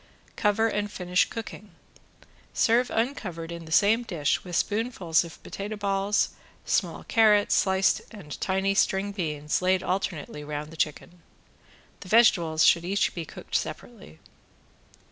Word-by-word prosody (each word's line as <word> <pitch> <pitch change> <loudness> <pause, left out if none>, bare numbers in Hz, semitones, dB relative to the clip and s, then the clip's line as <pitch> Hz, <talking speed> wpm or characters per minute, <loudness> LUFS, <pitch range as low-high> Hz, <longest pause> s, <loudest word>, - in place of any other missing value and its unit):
Cover 215 +2 +2
and 205 -1 -2
finish 180 -1 +1
cooking. 215 -2 -8 0.8
Serve 240 +2 +3
uncovered 190 -9 -3
in 170 -1 -7
the 160 - -12
same 210 +7 +4
dish 170 -11 -1
with 180 -2 -6
spoonfuls 205 -6 +1
of 170 -1 -12
potato 205 +2 -6
balls, 200 0 0 0.4
small - - -1
carrots 215 -3 +4
sliced 190 0 +2
and 195 -10 -10
tiny 190 +1 +1
string 195 0 +1
beans 150 -6 -2
laid 185 0 +2
alternately 175 -5 -3
round 150 +1 -5
the - - -11
chicken. 160 +3 -3 0.8
The 185 - -11
vegetables 170 -8 +4
should 170 - +5
each 195 +3 0
be 170 -2 -5
cooked - - -12
separately. 75 +1 -4
190 Hz, 135 wpm, -26 LUFS, 165-210 Hz, 0.8 s, should